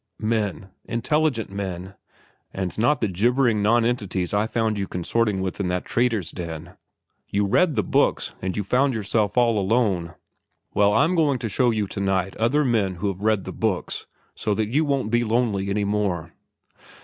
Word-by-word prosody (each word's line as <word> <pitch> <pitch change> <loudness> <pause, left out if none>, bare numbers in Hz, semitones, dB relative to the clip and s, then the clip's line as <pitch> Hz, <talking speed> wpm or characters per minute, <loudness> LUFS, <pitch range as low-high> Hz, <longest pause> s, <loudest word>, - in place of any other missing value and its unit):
"Men, 105 -3 -2
intelligent 120 -1 0
men, 95 -1 -5 0.6
and 95 -2 -3
not 135 +7 +2
the 110 - +2
gibbering 115 +4 +2
nonentities 105 -5 +1
I 105 +2 +2
found 110 -2 0
you 100 - -2
consorting 100 +3 0
with 95 +1 -3
in 100 - 0
that 90 0 -2
trader's 115 -8 0
den. 85 0 -7 0.5
You 100 0 +1
read 155 - +3
the 105 - +1
books - - +1
and 95 +1 -3
you 105 - 0
found 130 +5 +2
yourself 105 0 0
all 115 -3 +4
alone. 95 -5 0 0.6
Well, 100 0 +4
I'm 155 +10 +3
going 150 -6 +2
to 115 -2 -4
show 125 +5 +2
you 110 -3 0
to 100 - -6
night 95 -1 0
some - - -11
other 145 +6 +3
men 105 -7 +1
who've 95 +1 -3
read 110 -2 +2
the 95 - -6
books, 110 -5 -2 0.3
so 105 - -1
that 110 0 -1
you 150 +6 +2
won't 135 -6 0
be 120 0 +3
lonely 110 -4 0
any 100 +1 0
more." 95 -5 -1
105 Hz, 175 wpm, -24 LUFS, 95-120 Hz, 0.6 s, all